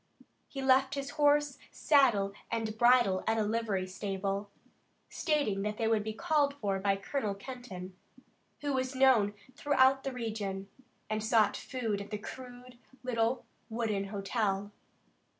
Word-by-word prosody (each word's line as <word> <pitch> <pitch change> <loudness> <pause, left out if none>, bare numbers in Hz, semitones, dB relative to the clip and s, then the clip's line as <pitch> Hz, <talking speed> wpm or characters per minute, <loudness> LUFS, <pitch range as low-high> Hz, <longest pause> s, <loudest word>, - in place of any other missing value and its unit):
He 270 -1 -6
left 265 +1 +4
his 275 0 -4
horse, 290 -1 +2
saddle 235 -10 +3 0.2
and 225 -2 -2
bridle 240 -5 +4
at 225 - +2
a 220 - +2
livery 210 -3 -1
stable, 195 +1 -3 0.6
stating 285 - 0
that 210 +1 -2
they 225 - 0
would 220 -2 +2
be 220 - -3
called 290 +2 +1
for 200 -8 -1
by 195 0 +2
Colonel 205 +1 -2
Kenton, 200 -5 -8 0.7
who 290 -1 -1
was 260 0 -1
known 245 -6 +4 0.2
throughout 270 -2 +3
the 270 - -2
region, 210 -5 -4 0.4
and 215 0 -2
sought 220 -1 +3
food 225 -6 -3
at 200 - -9
the 210 - -3
crude 245 +2 -10 0.2
little 240 0 0 0.2
wooden 220 -3 -1
hotel. 200 0 -2
225 Hz, 140 wpm, -31 LUFS, 200-260 Hz, 0.7 s, left